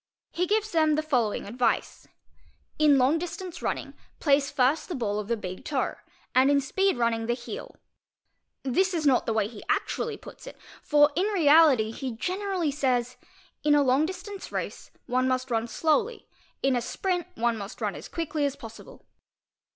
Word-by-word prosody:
He 360 Hz, +1 st, -1 dB
gives 430 Hz, +2 st, +1 dB
them 315 Hz, -2 st, +3 dB
the 310 Hz, -, 0 dB
following 245 Hz, -9 st, 0 dB
advice 245 Hz, +4 st, -1 dB, 0.3 s
:—"' -, -, -33 dB, 0.3 s
In 300 Hz, -2 st, +6 dB
long 270 Hz, +5 st, +3 dB
distance 355 Hz, +1 st, -6 dB
rur -, -, 0 dB
nit -, -, -9 dB, 0.3 s
place 280 Hz, -2 st, +3 dB
first 265 Hz, +7 st, +1 dB
the 355 Hz, -, -3 dB
ball 210 Hz, -5 st, -1 dB
of 210 Hz, -, -5 dB
the 235 Hz, 0 st, 0 dB
big 185 Hz, -3 st, -7 dB
toe 275 Hz, -4 st, -1 dB, 0.4 s
and 260 Hz, +2 st, +5 dB
in 285 Hz, 0 st, +4 dB
speed 380 Hz, +6 st, +1 dB
running 230 Hz, -1 st, 0 dB
the 240 Hz, -, +1 dB
heel"'. 425 Hz, -, -8 dB, 0.9 s
e 265 Hz, +8 st, +3 dB, 0.2 s
not 265 Hz, -3 st, +3 dB
the 225 Hz, -, +1 dB
way 215 Hz, -2 st, +1 dB
he 220 Hz, -1 st, -11 dB
actually 420 Hz, +1 st, -1 dB
puts -, -, -13 dB
it; -, -, -10 dB, 0.2 s
for 295 Hz, 0 st, +4 dB
in 370 Hz, +5 st, +2 dB
reality 300 Hz, -, +5 dB
he 255 Hz, +1 st, -5 dB
generally 365 Hz, -, -2 dB
says: 255 Hz, -3 st, 0 dB, 0.5 s
"Inal 290 Hz, -2 st, +4 dB
distance 385 Hz, +2 st, -7 dB
race; -, -, -5 dB, 0.2 s
one 255 Hz, +1 st, +1 dB
must 255 Hz, 0 st, -1 dB
run 225 Hz, 0 st, 0 dB
slowly; 425 Hz, -, 0 dB, 0.4 s
in 270 Hz, -1 st, +3 dB
a 245 Hz, -, +1 dB
sprint, 355 Hz, +7 st, -2 dB
one 235 Hz, 0 st, +1 dB
must 205 Hz, 0 st, -8 dB
run -, -, -1 dB
as -, -, -9 dB
quic! 330 Hz, -2 st, -5 dB
as 280 Hz, -1 st, 0 dB
possible". 225 Hz, -3 st, -12 dB
280 Hz, 175 wpm, -27 LUFS, 240-340 Hz, 0.9 s, In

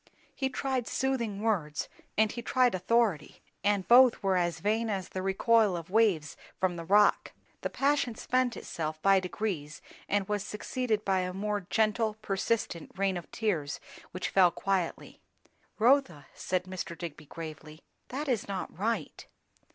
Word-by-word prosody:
He 265 Hz, -1 st, -1 dB
tried 260 Hz, -2 st, -2 dB
soothing 235 Hz, -7 st, -1 dB
words, 165 Hz, -10 st, 0 dB, 0.3 s
and 215 Hz, 0 st, +4 dB
he 240 Hz, -, -5 dB
tried 250 Hz, +1 st, +2 dB
authority; 190 Hz, -4 st, 0 dB, 0.2 s
and 205 Hz, -2 st, +1 dB
both 245 Hz, -1 st, +6 dB
were 195 Hz, -1 st, +2 dB
as 175 Hz, -2 st, 0 dB
vain 220 Hz, +2 st, 0 dB
as 195 Hz, -3 st, -3 dB
the 185 Hz, -, -4 dB
recoil 195 Hz, +1 st, +3 dB
of 170 Hz, +1 st, -9 dB
waves 195 Hz, -9 st, +2 dB, 0.2 s
from 180 Hz, -2 st, 0 dB
a -, -, -5 dB
rock. 205 Hz, +5 st, +3 dB, 0.3 s
The -, -, -2 dB
passion 275 Hz, -4 st, +1 dB
spent 255 Hz, +1 st, 0 dB
itself 155 Hz, -1 st, -4 dB
by 195 Hz, -1 st, +6 dB
degrees, 180 Hz, -6 st, -4 dB, 0.3 s
and 200 Hz, -1 st, +1 dB
was 210 Hz, -1 st, -1 dB
succeeded 215 Hz, +1 st, -2 dB
by 190 Hz, -1 st, +2 dB
a 180 Hz, 0 st, -2 dB
more 205 Hz, -1 st, -2 dB
gentle, 220 Hz, 0 st, +1 dB
persistent 200 Hz, -4 st, -2 dB
rain 195 Hz, -1 st, +1 dB
of 175 Hz, -, -6 dB
tears 170 Hz, -10 st, -2 dB, 0.3 s
which 185 Hz, -, -4 dB
fell 185 Hz, -2 st, +5 dB
quietly. 185 Hz, -1 st, -2 dB, 0.6 s
"Rotha," 220 Hz, -, +3 dB
said 185 Hz, -1 st, -1 dB
Mr. 185 Hz, -2 st, -6 dB
Digby 155 Hz, -3 st, -7 dB
gravely, 155 Hz, 0 st, -9 dB, 0.2 s
"that 290 Hz, +4 st, -4 dB
is 240 Hz, -6 st, 0 dB
not 195 Hz, -2 st, -5 dB
right." 225 Hz, +5 st, -3 dB
200 Hz, 150 wpm, -30 LUFS, 180-230 Hz, 0.6 s, both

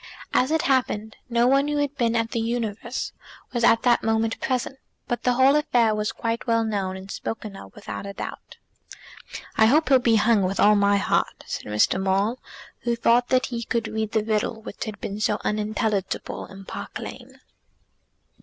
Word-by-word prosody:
As 255 Hz, -, +3 dB
it 320 Hz, 0 st, +1 dB
happened, 220 Hz, -5 st, 0 dB
no 235 Hz, 0 st, +3 dB
one 275 Hz, +2 st, +3 dB
who 295 Hz, 0 st, -1 dB
had 290 Hz, -1 st, -1 dB
been 235 Hz, -4 st, +1 dB
at 230 Hz, -1 st, 0 dB
The 230 Hz, -, -1 dB
Universe 230 Hz, +1 st, -3 dB, 0.4 s
was 240 Hz, -1 st, -1 dB
at 230 Hz, -1 st, +5 dB
that 240 Hz, -1 st, +4 dB
moment 225 Hz, 0 st, 0 dB
present; 260 Hz, +1 st, -2 dB, 0.3 s
but 240 Hz, -, -2 dB
the 250 Hz, -, +2 dB
whole 260 Hz, +3 st, +5 dB
affair 240 Hz, -7 st, +3 dB
was 210 Hz, 0 st, -1 dB
now -, -, -22 dB
quite 230 Hz, +1 st, -2 dB
well 230 Hz, -1 st, +3 dB
known, 195 Hz, -4 st, -2 dB
and 190 Hz, -, -9 dB
was 195 Hz, -, -7 dB
spoken 215 Hz, -2 st, -5 dB
of 95 Hz, -, -12 dB
without 100 Hz, -, -7 dB
a 200 Hz, -, -6 dB
doubt. -, -, -8 dB, 1.0 s
"I 220 Hz, -, +6 dB
hope 295 Hz, +3 st, +3 dB
he'll 265 Hz, -2 st, +6 dB
be 235 Hz, -2 st, +3 dB
hung, 220 Hz, 0 st, +4 dB
with 190 Hz, +1 st, -1 dB
all 210 Hz, +1 st, +6 dB
my 200 Hz, 0 st, +3 dB
heart," 200 Hz, -, 0 dB
said -, -, -5 dB
Mr. 105 Hz, -, +2 dB
Maule, 195 Hz, +6 st, +1 dB, 0.4 s
who 240 Hz, -1 st, -1 dB
thought 235 Hz, +1 st, +3 dB
that 255 Hz, 0 st, +3 dB
he 235 Hz, -2 st, -4 dB
could 230 Hz, -1 st, -1 dB
read 220 Hz, -1 st, -3 dB
the 220 Hz, -2 st, +2 dB
riddle 220 Hz, +1 st, -1 dB
which -, -, -6 dB
had 210 Hz, -3 st, -7 dB
been 200 Hz, +1 st, -5 dB
so 210 Hz, -1 st, +1 dB
unintelligible 210 Hz, -2 st, -2 dB
in 195 Hz, 0 st, -12 dB
Park -, -, -6 dB
Lane. -, -, -9 dB
225 Hz, 195 wpm, -24 LUFS, 210-245 Hz, 1.0 s, I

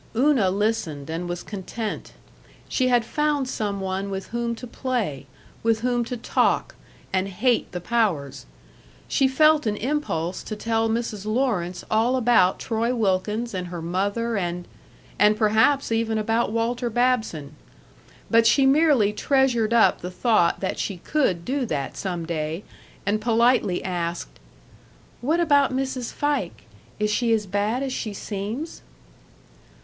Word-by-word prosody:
Una 255 Hz, -5 st, +3 dB
listened 185 Hz, -8 st, -1 dB
and 175 Hz, +2 st, -4 dB
was 175 Hz, 0 st, -4 dB
content; 210 Hz, +2 st, -5 dB, 0.5 s
she 255 Hz, -, +1 dB
had 245 Hz, -2 st, +3 dB
found 295 Hz, +1 st, 0 dB
some 205 Hz, -5 st, -2 dB
one 190 Hz, +1 st, -3 dB
with 190 Hz, -1 st, -5 dB
whom 235 Hz, 0 st, -2 dB
to 240 Hz, -, -9 dB
play, 230 Hz, -, -3 dB, 0.3 s
with 225 Hz, -1 st, +1 dB
whom 245 Hz, 0 st, +1 dB
to 245 Hz, +1 st, -4 dB
talk 230 Hz, -, +1 dB, 0.4 s
and 190 Hz, 0 st, +1 dB
hate 230 Hz, +5 st, 0 dB
the 180 Hz, -, -4 dB
powers.... 160 Hz, -, -1 dB, 0.6 s
She 270 Hz, -, +3 dB
felt 305 Hz, 0 st, +4 dB
an 210 Hz, -1 st, 0 dB
impulse 205 Hz, -, -2 dB
to 215 Hz, -, -6 dB
tell 225 Hz, +1 st, 0 dB
Mrs. 220 Hz, -3 st, -3 dB
Lawrence 215 Hz, -7 st, -1 dB
all 225 Hz, +4 st, +3 dB
about 230 Hz, -7 st, +4 dB
Troy 230 Hz, +2 st, -1 dB
Wilkins 210 Hz, +2 st, 0 dB
and 180 Hz, -1 st, -3 dB
her 175 Hz, -1 st, -6 dB
mother 200 Hz, +7 st, -1 dB
and 175 Hz, -1 st, -3 dB, 0.5 s
and 210 Hz, +1 st, +5 dB
perhaps 225 Hz, +6 st, +3 dB
even 225 Hz, -1 st, 0 dB
about 225 Hz, +1 st, 0 dB
Walter 235 Hz, +2 st, -1 dB
Babson. 225 Hz, -, 0 dB, 0.7 s
But 230 Hz, 0 st, +4 dB
she 270 Hz, +4 st, +4 dB
merely 270 Hz, -7 st, +4 dB
treasured 245 Hz, -2 st, +2 dB
up 235 Hz, -1 st, +4 dB
the 180 Hz, -, -4 dB
thought 185 Hz, -2 st, +2 dB
that 190 Hz, -, -2 dB
she 195 Hz, -, -2 dB
could 180 Hz, -, 0 dB
do 270 Hz, +1 st, -1 dB
that 140 Hz, -7 st, -3 dB
some 175 Hz, -4 st, -3 dB
day, 160 Hz, +2 st, -3 dB, 0.4 s
and 210 Hz, +2 st, 0 dB
politely 230 Hz, -4 st, +2 dB
asked: 175 Hz, -2 st, -4 dB, 0.8 s
"What 310 Hz, +7 st, +1 dB
about 285 Hz, -5 st, +4 dB
Mrs. 260 Hz, -2 st, -2 dB
Fike? 290 Hz, -12 st, -2 dB, 0.3 s
Is 210 Hz, 0 st, 0 dB
she 235 Hz, +2 st, +1 dB
as 215 Hz, -2 st, +1 dB
bad 205 Hz, +6 st, -1 dB
as 265 Hz, -2 st, -3 dB
she 215 Hz, -5 st, -4 dB
seems?" 215 Hz, +12 st, -5 dB
220 Hz, 145 wpm, -24 LUFS, 190-245 Hz, 0.8 s, and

